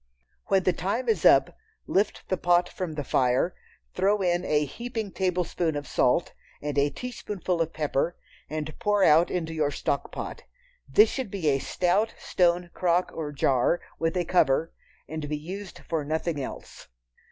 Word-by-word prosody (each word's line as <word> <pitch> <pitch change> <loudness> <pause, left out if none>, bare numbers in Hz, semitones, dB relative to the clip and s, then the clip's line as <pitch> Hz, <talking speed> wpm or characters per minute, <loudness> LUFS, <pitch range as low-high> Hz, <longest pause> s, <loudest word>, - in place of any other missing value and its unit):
When 195 -1 +3
the 185 - +3
time 200 +10 -2
is 215 -9 +1
up, 135 0 +6 0.3
lift 200 +2 0
the 185 - +1
pot 175 0 +3
from 180 -3 -5
the 150 -1 -3
fire, 125 -1 +2 0.4
throw 200 +1 +2
in 175 0 +1
a 150 0 +2
heaping 225 - -5
tablespoonful 180 -4 -1
of 145 - -6
salt, 125 +7 +2 0.3
and 145 0 -4
a 145 0 +3
teaspoonful 195 - -3
of 165 0 0
pepper, 155 +2 -1 0.3
and 155 0 -4
pour 205 -3 +2
out 165 +1 +6
into 165 -3 -2
your 155 -2 +1
"stock 140 0 -2
pot." - - -6 0.5
This 425 +2 +6
should 260 -6 -3
be 185 -6 0
a 135 -1 +2
stout 185 +9 0
stone 175 -1 +1
crock 180 0 +1
or 155 -2 -4
jar, 135 +3 +2 0.2
with 165 +2 0
a 175 - 0
cover, 160 -2 +2 0.3
and 155 -2 -5
be 150 - -1
used 190 +6 -7
for 160 -3 -1
nothing 155 0 -2
else. - - -8
170 Hz, 165 wpm, -27 LUFS, 150-190 Hz, 0.5 s, up